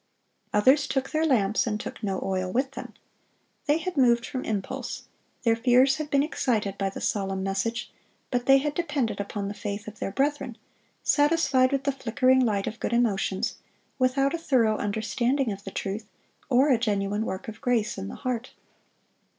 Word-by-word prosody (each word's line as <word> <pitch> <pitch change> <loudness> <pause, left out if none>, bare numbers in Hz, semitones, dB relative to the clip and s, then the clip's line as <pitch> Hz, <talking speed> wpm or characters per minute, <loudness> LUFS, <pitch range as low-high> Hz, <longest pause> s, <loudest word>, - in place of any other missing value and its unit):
Others 260 +7 +4
"took 265 -1 -1
their 315 0 +1
lamps, 225 -2 +2
and 210 -1 -1
took - - -7
no 195 -3 -1
oil 185 -1 -1
with 265 +4 0
them." - - -8 0.7
They 295 +1 +4
had 350 +2 -4
moved 240 -2 +4
from 255 - -4
impulse. 205 -3 -4 0.4
Their 230 -2 +4
fears 255 +3 +4
had 305 -1 -4
been 280 -1 +3
excited 225 -9 -1
by 195 -1 -1
the 195 - -7
solemn 195 -2 -1
message, 195 +5 -2 0.4
but 245 -1 -1
they 270 0 +8
had 295 +2 -1
depended 285 - -1
upon 200 0 -3
the 200 - -4
faith 205 0 -5
of 215 0 -9
their - - -3
brethren, 275 0 -1 0.5
satisfied 290 -4 +3
with 275 -1 0
the 280 - +1
flickering 260 0 +2
light 210 -6 +1
of 230 - -5
good - - -2
emotions, 205 -5 0 0.4
without 270 +3 +2
a 335 - -2
thorough 235 -9 +2
understanding 235 +5 0
of 200 0 -7
the - - -4
truth, 200 +3 -4 0.4
or 270 +3 +4
a 245 - +4
genuine 205 -1 0
work 190 -4 -5
of 220 - -8
grace 230 -4 +1
in 95 - -5
the - - -7
heart. 250 -1 -4
235 Hz, 180 wpm, -26 LUFS, 205-270 Hz, 0.7 s, they